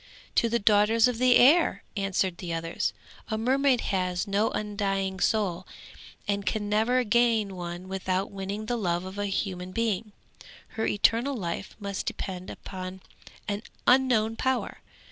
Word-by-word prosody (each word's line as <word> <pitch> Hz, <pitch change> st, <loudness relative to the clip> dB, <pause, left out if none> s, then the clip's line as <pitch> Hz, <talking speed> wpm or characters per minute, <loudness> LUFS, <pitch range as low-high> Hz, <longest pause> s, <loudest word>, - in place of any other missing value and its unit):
'To 230 Hz, -, +3 dB
the 235 Hz, -, +2 dB
daughters 215 Hz, +2 st, +4 dB
of 245 Hz, -2 st, -2 dB
the 250 Hz, -1 st, +5 dB
air!' 315 Hz, +7 st, +5 dB
answered 195 Hz, -3 st, 0 dB
the 175 Hz, -2 st, -5 dB
others; 165 Hz, 0 st, -1 dB, 0.4 s
'a 220 Hz, -, -1 dB
mermaid 260 Hz, +2 st, +2 dB
has 180 Hz, -2 st, -1 dB
no 205 Hz, +2 st, +1 dB
undying 195 Hz, -2 st, -2 dB
soul, 185 Hz, -4 st, 0 dB, 0.6 s
and 200 Hz, 0 st, 0 dB
can 210 Hz, -2 st, -1 dB
never 225 Hz, +5 st, +2 dB
gain 225 Hz, -3 st, +2 dB
one 175 Hz, +1 st, -6 dB
without 190 Hz, 0 st, -2 dB
winning 200 Hz, +2 st, -4 dB
the 240 Hz, +2 st, -1 dB
love 175 Hz, -4 st, -1 dB
of 190 Hz, +2 st, -7 dB
a 205 Hz, -, 0 dB
human 185 Hz, -2 st, -3 dB
being. 220 Hz, 0 st, -1 dB, 0.6 s
Her 220 Hz, -, -2 dB
eternal 235 Hz, +6 st, +2 dB
life 185 Hz, -2 st, -4 dB
must 200 Hz, -2 st, -4 dB
depend 185 Hz, 0 st, -4 dB
upon 185 Hz, 0 st, -7 dB, 0.5 s
an 205 Hz, 0 st, -2 dB, 0.2 s
unknown 240 Hz, -4 st, +3 dB
power. 260 Hz, -1 st, -1 dB
205 Hz, 145 wpm, -27 LUFS, 190-230 Hz, 0.6 s, the